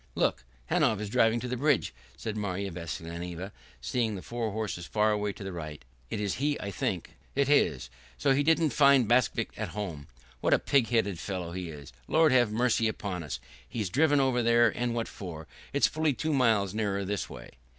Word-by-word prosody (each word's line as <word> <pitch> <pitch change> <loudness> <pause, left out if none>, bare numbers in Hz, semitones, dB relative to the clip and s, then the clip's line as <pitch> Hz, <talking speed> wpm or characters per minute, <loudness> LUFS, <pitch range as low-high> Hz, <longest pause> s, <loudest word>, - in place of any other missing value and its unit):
"Look, - - 0 0.3
Hanov 110 - +3
is 105 -1 -4
driving 115 +1 +3
to 125 - -4
the 125 - -2
bridge," 140 - +2 0.2
said 110 -2 -4
Marya 100 -2 -2
Vassilyevna, 85 +2 -6 0.3
seeing 110 - 0
the 95 - -7
four 120 -2 -3
horses 100 -5 -4
far 110 0 +2
away 105 -1 0
to 100 - -9
the 95 - -5
right. 75 -6 -7 0.2
"It - - -3
is 100 -3 -1
he, 145 0 +1
I 100 - -4
think." 90 -1 -2 0.2
"It 140 0 +2
is. 70 - +2 0.3
So 135 - +3
he 140 - +2
didn't 160 0 +3
find 140 -2 +5
Bakvist 120 -2 +2
at - - -3
home. 80 -8 -4 0.3
What - - +4
a - - +3
pig 135 -5 +2
headed 100 -7 +1
fellow 90 -3 -4
he 90 -1 -5
is. 75 -4 -10
Lord 160 -1 +4
have 120 -4 +4
mercy 115 0 +2
upon 100 -4 -3
us! 75 -5 -5 0.3
He's 105 -6 -3
driven 145 0 +4
over 130 -2 +2
there, 115 0 +5
and 120 +1 -2
what 115 -1 -1
for? 80 -5 -8 0.3
It's 140 - +3
fully 155 -2 +1
two 155 +5 -1
miles 110 -8 +3
nearer 100 -2 -1
this 100 +1 -2
way." - - -10
110 Hz, 200 wpm, -29 LUFS, 90-125 Hz, 0.3 s, find